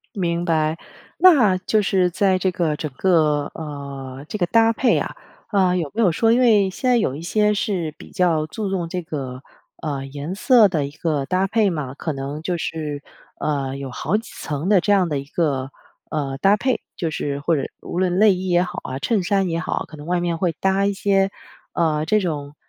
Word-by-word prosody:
明 170 -3 -1
白， 160 -2 +1 0.4
那 280 - +6
就 215 +3 +1
是 185 -2 +2
在 185 +1 +2
这 185 0 +1
个 170 -4 -1
整 155 0 -4
个， 155 -5 +2
呃， 140 -3 -7
这 - - -4
个 180 -4 +1
搭 225 +4 +4
配 245 +3 +2
啊， - - -4 0.3
呃， 190 -4 +3
有 165 -5 -2
没 230 - +1
有 185 -6 +4
说 225 +7 +2
因 240 - +4
为 215 -6 +5
现 255 +7 -1
在 245 - +5
有 135 - 0
一 155 - -7
些 210 +4 +2
是 185 -7 -2
比 - - -13
较 170 -5 +1
注 210 +5 -4
重 180 -3 -2
这 180 +2 -3
个， 135 -5 -6 0.4
呃， 140 -3 -3
颜 145 +5 -5
色 225 +1 +5
的 160 -6 -1
一 - - -8
个 150 -1 -2
搭 185 +6 +1
配 210 0 +2
嘛， 145 -6 -4
可 160 +2 -3
能 140 +2 -5
就 175 +1 -2
是， 150 -3 -4 0.4
呃， 135 -3 -1
有 135 -1 -6
好 155 +9 -1
几 225 - -10
层 150 +4 -3
的 200 -3 +5
这 205 - +2
样 190 -3 +3
的 145 -3 -1
一 135 - -5
个， 140 -3 -1 0.4
呃， 140 -3 -2
搭 195 +8 +4
配。 255 +2 0
就 165 - -2
是 145 -2 -3
或 160 +3 +1
者 135 - -1 0.2
无 - - -5
论 185 -1 +1
内 215 -1 +7
衣 185 +1 -4
也 175 0 +3
好 180 0 -5
啊， 130 - -4
衬 205 - 0
衫 195 0 +1
也 165 -1 -1
好， 165 - -2
可 155 - -11
能 145 0 -10
外 175 0 0
面 170 -1 -1
会 175 -1 +1
搭 195 +1 +2
一 200 - +1
些， 195 0 +1 0.4
呃， 155 -2 +1
这 215 +6 +3
种， 150 -6 -4
175 Hz, 235 characters per minute, -22 LUFS, 150-195 Hz, 0.4 s, 内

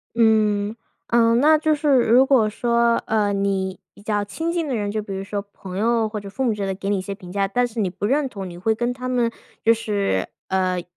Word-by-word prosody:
嗯， 215 -2 +2 0.3
嗯， 230 0 +4
那 310 +3 +5
就 310 0 +2
是 300 0 0
如 240 +3 +5
果 250 -6 +3
说， 235 +1 +2
呃， 210 -2 +1
你 195 -1 -1
比 - - -17
较 205 0 -1
亲 325 +12 -3
近 335 -2 -1
的 265 - -1
人， 205 -2 -2
就 215 +1 -2
比 205 -1 -7
如 190 - -4
说 200 +1 -3
朋 185 -1 -8
友 225 +1 +1
或 215 0 -4
者 200 -1 -9
父 250 +7 -3
母 235 -4 +2
之 210 - -6
类 - - -1
的 195 - -1
给 195 +1 -5
你 205 - +1
一 - - -3
些 195 +1 -5
评 180 -2 -11
价， 200 +1 0
但 245 +5 +1
是 235 -1 -6
你 195 -4 +1
不 190 +3 -5
认 275 +5 +1
同， 195 -7 -7
你 175 - -10
会 220 +5 0
跟 240 +2 -1
他 255 0 -6
们 245 -2 +1 0.3
就 230 - +6
是， 205 - -1 0.2
呃， 185 -2 0
215 Hz, 270 characters per minute, -22 LUFS, 200-240 Hz, 0.3 s, 就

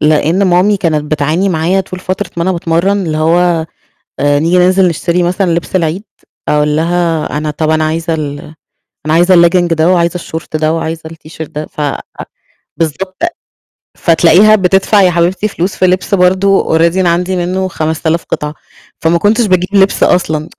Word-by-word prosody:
لإن 155 +5 +2
مامي 185 +3 +3
كانت 155 -5 -2
بتعاني 155 +6 0
معايا 175 +2 0
طول 185 -1 -8
فترة 185 0 -4
ما 170 - -1
أنا 185 - 0
باتمرّن، 175 +3 0
اللي 155 - -2
هو 165 +1 +1 0.5
آآ 145 0 +2
نيجي 170 +4 +1
ننزل 185 +1 +3
نشتري 170 +1 -1
مثلًا 180 +1 0
لبس 170 +2 -3
العيد، 175 +3 -1 0.4
أقول 150 0 +1
لها 165 -1 -1
أنا 150 0 -3
طَب 155 +1 -2
أنا 155 0 +1
عايزة 165 +2 -2
ال 145 -2 -4 0.7
أنا 155 - +1
عايزة 175 +3 +4
الlegging 175 +1 +4
ده 160 +1 +1
وعايزة 170 -1 +1
الشورت 165 -2 -6
ده 155 0 0
وعايزة 165 0 -4
الt 160 -1 -14
shirt 160 -2 -7
ده، 150 +1 -6
ف - - -9 1.0
بالضبط، 185 +4 -3 0.8
فتلاقيها 175 +5 +4
بتدفع 195 +1 +2
يا 185 -2 +4
حبيبتي 175 +4 0
فلوس 190 -2 -3
في 185 - +1
لبس 185 +2 -1
برضه 190 -2 +2
already 170 +2 +2
أنا 185 -2 +2
عندي 180 +2 -1
منه 185 +2 -2
خمس 160 -2 -3
آلاف 165 +1 0
قطعة، 150 0 -4 0.5
فما 165 +1 +2
كنتش 220 +6 +2
باجيب 185 -2 +1
لبس 195 0 +3
أصلًا، 160 -3 0
170 Hz, 170 wpm, -12 LUFS, 160-185 Hz, 1.0 s, عايزة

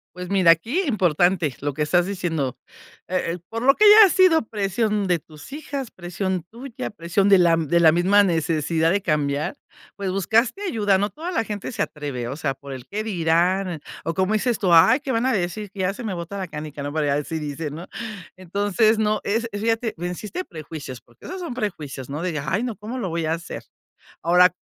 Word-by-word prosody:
Pues 180 0 -7
mira, 190 -4 +5
aquí 230 - +1
importante 175 - +2
lo 145 -1 -2
que 150 +2 -1
estás 175 +3 +2
diciendo, 165 -9 -2 0.5
eh 185 0 0
eh, - - -10
por 230 0 -4
lo 275 +2 +5
que 425 - +4
haya 420 -1 +9
sido, 365 -4 +5
presión 210 0 -1
de 175 -2 +2
tus 155 - -14
hijas, 280 -4 -5
presión 185 -1 -3
tuya, 240 +1 -6
presión 195 +1 0
de 195 - +8
la 170 -2 +5
de 165 +1 +1
la 160 -1 +6
misma 190 +4 +4
necesidad 165 -2 +1
de 200 +2 +1
cambiar, 150 - -1 0.4
pues 195 -2 -3
buscaste 225 - +1
ayuda. 210 - +2
No 205 +1 -1
toda 335 - -6
la 225 -10 0
gente 205 +2 -5
se 215 -4 -3
atreve, 140 -8 -4
o 135 - -4
sea, 150 -3 -2
por 140 0 -9
el 130 -2 -9
qué 210 +2 -3
dirán 175 -1 +1 0.2
o 165 - -2
como 190 +4 +1
dices 230 +1 0
tú: 180 -4 +2
"Ay, 165 - +7
qué 275 -2 -3
van 230 +2 +1
a 260 - +2
decir, 195 +2 -2
que 200 - -12
ya 185 +1 +1
se 240 - -8
me 215 -4 -3
bota 175 +3 -6
la 190 -2 -4
canica", 150 -1 -6
no, 145 - -4
por 155 +1 -1
ahí 145 - 0
así 150 +3 -1
dicen, 150 0 -5
¿no?, 170 +3 -8 0.5
entonces 205 +4 +1
no, 215 0 +1
es 225 +3 0
fíjate, 225 +2 -1
venciste 180 - -4
prejuicios, 155 - -8
porque 120 - -20
esos 375 - -6
son 345 -8 -5
prejuicios, 150 - -5
no 150 +3 -4
digas: 155 -5 -3
"Ay, 200 +6 0
no, 245 -3 -3
¿cómo 220 +5 -7
lo 225 - -2
voy 165 0 -2
a 160 - +1
hacer?", 170 +1 -6 0.6
ahora, 180 +2 +5
185 Hz, 210 wpm, -23 LUFS, 160-215 Hz, 0.6 s, haya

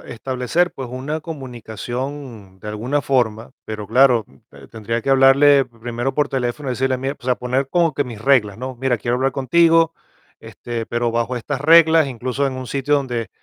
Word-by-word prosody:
establecer, 130 +9 -1
pues, 130 -2 -7
una 140 +5 -4
comunicación 125 - -7
de 105 - -8
alguna 120 +7 -2
forma, 120 -4 0
pero 105 -1 -6
claro, 125 0 +4 0.3
te 70 -1 -15
tendría 115 +1 -4
que 135 - -1
hablarle 135 +1 +5
primero 120 +2 -5
por 145 -1 +1
teléfono, 130 +2 -3
y - - 0
decirle: 130 +1 0
"Mira", 135 +2 -3
o - - -20
sea, 125 -1 +2
poner 130 +3 -2
como 170 -1 +2
que 145 - -1
mis 115 -4 -9
reglas, 115 -7 +2
¿no? 130 +1 -6
"Mira, 130 -2 +1
quiero 120 +3 -1
hablar 135 +1 0
contigo, 165 +4 +3 0.5
este, 115 -2 -7
pero 120 0 -1
bajo 115 +2 -1
estas 135 +3 -4
reglas", 160 0 +6
incluso 130 +2 -2
en 135 - -2
un 130 0 -6
sitio 140 +3 0
donde 120 -6 -2
130 Hz, 185 wpm, -20 LUFS, 120-140 Hz, 0.5 s, reglas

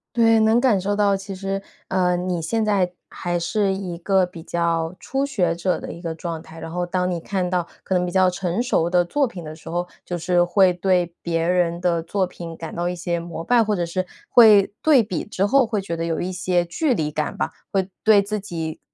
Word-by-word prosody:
对， 225 -1 +5
能 220 +2 +4
感 240 -7 +3
受 200 +2 -1
到， 205 -1 +3
其 195 0 -7
实， 195 +1 -3 0.3
呃， 180 -1 +2
你 180 -2 -2
现 225 +7 0
在 195 -4 +1 0.2
还 175 -1 -3
是 195 +3 0
一 190 -3 -4
个 190 +1 +2
比 175 -2 -11
较 170 0 -1
初 270 +1 -1
学 180 -12 0
者 180 +1 -1
的 - - -7
一 170 - -9
个 165 -1 -3
状 165 -1 -5
态， 165 0 -12
然 165 - -7
后 175 +1 -2
当 180 +1 -1
你 175 - -1
看 185 +1 -2
到 175 -2 0 0.2
可 190 - -2
能 180 -1 +2
比 175 - -3
较 185 0 +4
成 180 +3 -1
熟 170 -9 +1
的 175 -1 +3
作 285 +7 +1
品 185 -8 -8
的 155 0 -8
时 160 - -10
候， 175 +1 -2 0.2
就 175 - -4
是 175 +1 +2
会 185 +1 +4
对 180 -2 +1
别 165 -1 -1
人 175 -1 +1
的 170 -2 +1
作 190 +3 -1
品 170 -2 -8
感 165 0 -7
到 175 +1 -1
一 - - -3
些 175 -1 -2
膜 170 -1 -6
拜， 240 +4 +3
或 210 -1 0
者 175 -2 -1
是， 185 +2 -2 0.2
会 210 -4 +6
对 290 -6 +6
比 185 -5 -3
之 200 -1 -1
后， 270 +4 +4
会 215 -3 -1
觉 170 -3 -4
得 165 - -3
有 165 -1 -1
一 185 - -2
些 180 -1 +1
距 280 - 0
离 155 -10 -1
感 150 0 -2
吧， - - -2 0.2
会 190 -1 0 0.2
对 215 -2 +7
自 210 +2 -3
己 165 -5 -5
180 Hz, 255 characters per minute, -22 LUFS, 170-200 Hz, 0.3 s, 对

